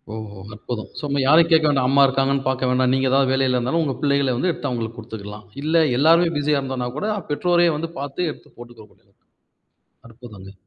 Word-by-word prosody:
ஓஹோ 105 -2 -8 0.2
அற்புதம். 110 +1 -6
ஸோ - - -11
இனிமே 140 0 -1
யாரயும் 165 +4 +5
கேட்க 160 -1 +4
வேண்டாம். 135 -3 +1
அம்மா 140 0 +5
இருக்காங்கன்னு 135 +1 0
பாக்க 130 -1 -1
வேண்டாம். 125 0 +2
நீங்க 130 0 +1
ஏதாவது 135 -1 +2
வேலையில 130 -1 +1
இருந்தாலும் 135 +7 0
உங்க 135 -4 -2
பிள்ளைகள 140 -3 +1
வந்து 180 - 0
எடுத்து 145 -4 -5
அவங்களுக்கு 115 -2 -4
குடுத்துக்கலாம். 105 -1 -9 0.2
இல்ல 160 +1 +3
எல்லாரும் 165 +2 +4
பிஸியா 145 0 +1
இருந்தானாக்கூட 130 - -4 0.2
பெற்றோரே 175 +3 +2
வந்து 165 +1 -4
பாத்து 145 +4 -3
எடுத்துப் - - -16
போட்டுக்க 120 -2 -13
வேண்டியது. - - -30 1.0
அற்புதங்க. 110 -5 -13
135 Hz, 180 wpm, -21 LUFS, 120-150 Hz, 1.0 s, யாரயும்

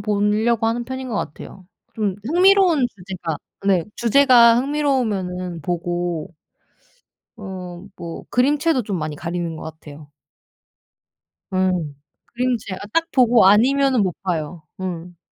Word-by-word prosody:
보려고 210 +2 +1
하는 235 +1 -1
편인 260 +1 -6
것 220 - -3
같아요. 185 +3 -7 0.3
좀 210 -4 -1
흥미로운 355 - +4
주제가 180 -5 -6 0.3
네 185 -4 +3
주제가 235 -1 +6
흥미로우면은 210 - -1
보고 175 -1 -3 1.0
어 185 -3 -8
뭐 170 -1 -8
그림체도 285 +2 +2
좀 200 -4 -3
많이 155 -1 -4
가리는 170 0 -4
것 - - -9
같아요. 150 -2 -11 1.4
음. 185 -5 0 0.3
그림체가 240 -6 -2
딱 330 0 +2
보고 240 -5 +5
아니면은 255 +4 +4
못 185 -4 -1
봐요. 165 -3 -3 0.2
음. 175 -1 -6
200 Hz, 245 characters per minute, -21 LUFS, 175-250 Hz, 1.4 s, 주제가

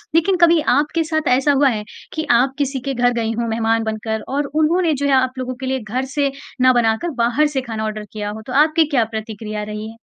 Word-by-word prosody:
लेकिन 350 +4 +3
कभी 340 -1 +6 0.2
आपके 300 +4 +1
साथ 315 -1 -2
ऐसा 265 +3 +3
हुआ 280 0 +4
है 215 -4 -2 0.3
कि 315 0 -3
आप 250 +3 +3
किसी 275 -2 -1
के 275 - 0
घर 245 -1 +2
गईं 225 -1 -1
हों 235 - -1
मेहमान 225 0 +1
बनकर 220 0 -3
और 290 - 0 0.2
उन्होंने 335 +1 +2
जो - - +2
है 280 - +1
आप 260 -1 +2
लोगों 255 0 -4
के 265 - -5
लिए 265 0 -1
घर 245 +4 -3
से 285 -2 +1 0.3
ना 255 0 +6
बनाकर 235 +7 +1
बाहर 270 +6 +2
से 265 - +1
खाना 225 -3 -5
ऑर्डर 215 0 -4
किया 210 -1 -4
हो। 215 +1 -7
तो 250 - -5
आपकी 315 +1 +2
क्या 265 -6 +2
प्रतिक्रिया 215 -1 -5
रही 210 +1 -6
है? - - -15
255 Hz, 240 wpm, -19 LUFS, 220-290 Hz, 0.3 s, कभी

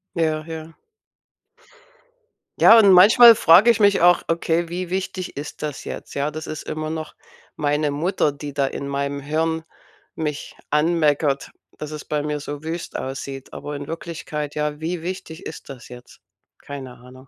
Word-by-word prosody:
Ja, 155 -2 0
ja. 160 0 -8 1.9
Ja, 230 - +8
und 205 -3 +7
manchmal 225 +6 +9
frage 190 +6 +6
ich 230 - -1
mich 200 -1 +4
auch: 175 0 +5
„Okay, 165 0 0
wie 180 +1 -4
wichtig 185 -2 -4
ist 150 +1 -7
das 150 -2 -5
jetzt?“ - - -7
Ja, 140 +2 -1
das 155 +1 -7
ist 155 - -6
immer 155 0 -4
noch 155 -1 -6 0.4
meine 150 0 0
Mutter, 155 +1 0
die 145 0 -8
da 140 -1 +1
in 140 - -5
meinem 140 0 -3
Hirn 160 +3 -1 0.5
mich 150 -2 -4
anmeckert, 150 -2 +1 0.3
dass 150 0 -7
es 150 -1 -7
bei 150 -1 -2
mir 150 0 -2
so 145 0 -6
wüst 165 +2 -5
aussieht, 135 0 -6
aber 145 - -6
in 140 0 -7
Wirklichkeit 160 -3 -5
ja, 150 0 -2
wie 170 +1 -3
wichtig 175 -2 -7
ist 160 - -9
das 130 -4 -10
jetzt? 125 0 -14 0.4
Keine 135 -3 -9
Ahnung. 130 +2 -16
155 Hz, 165 wpm, -22 LUFS, 145-170 Hz, 1.9 s, manchmal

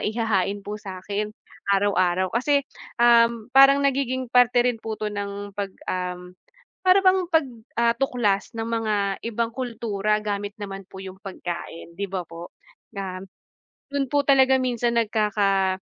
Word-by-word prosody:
ihahain 205 -3 -1
po 210 +1 -6
sa'kin 200 +1 -4 0.4
araw-araw, 185 -2 +2
kasi, 280 +4 +2 0.3
um, 235 0 +4
parang 275 +1 +7
nagiging 260 -2 -1
parte 245 -1 +5
rin 245 -3 0
po 220 -1 -5
'to 210 -1 -4
ng 200 0 -5
'pag 200 0 -3 0.2
um, 180 0 -4 0.5
para 370 +1 +6
bang 375 -1 +4
'pag, 320 -4 +3 0.3
ah, 235 0 +3
tuklas 235 -7 0
ng 225 0 -3
mga 225 -2 0 0.3
ibang 230 0 -2
kultura 215 -4 -1
gamit 205 -1 -3
naman 195 -1 -6
po 190 0 -12
yung 190 -1 -8
pagkain 170 -3 -7
di 200 0 -4
ba 185 -3 -3
po? 170 +1 -10 0.4
Nam 190 -3 -5 0.7
yun 280 -1 -2
po 290 - +4
talaga 265 -1 +5
minsan 240 -2 0
nagkaka 200 -3 +1
215 Hz, 145 wpm, -24 LUFS, 195-245 Hz, 0.7 s, parang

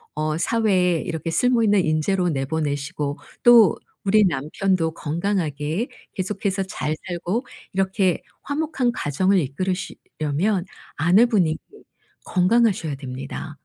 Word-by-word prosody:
어 155 0 -1
사회에 185 -5 +2
이렇게 165 0 -4
쓸모 240 +6 +3
있는 205 -3 +4
인재로 175 +4 +1
내보내시고 145 0 -2 0.3
또 235 -7 +7 0.3
우리 210 +2 +4
남편도 165 +2 0
건강하게 165 - -2 0.2
계속해서 195 0 -2
잘 155 -4 -3
살고 180 +7 -2 0.3
이렇게 190 -1 +1 0.2
화목한 285 -4 -1
가정을 185 +7 +1
이끌으시려면 175 +3 -2 0.3
아내분이 180 - +3 0.7
건강하셔야 185 -4 +2
됩니다. 135 +3 -6
180 Hz, 275 characters per minute, -23 LUFS, 155-200 Hz, 0.7 s, 또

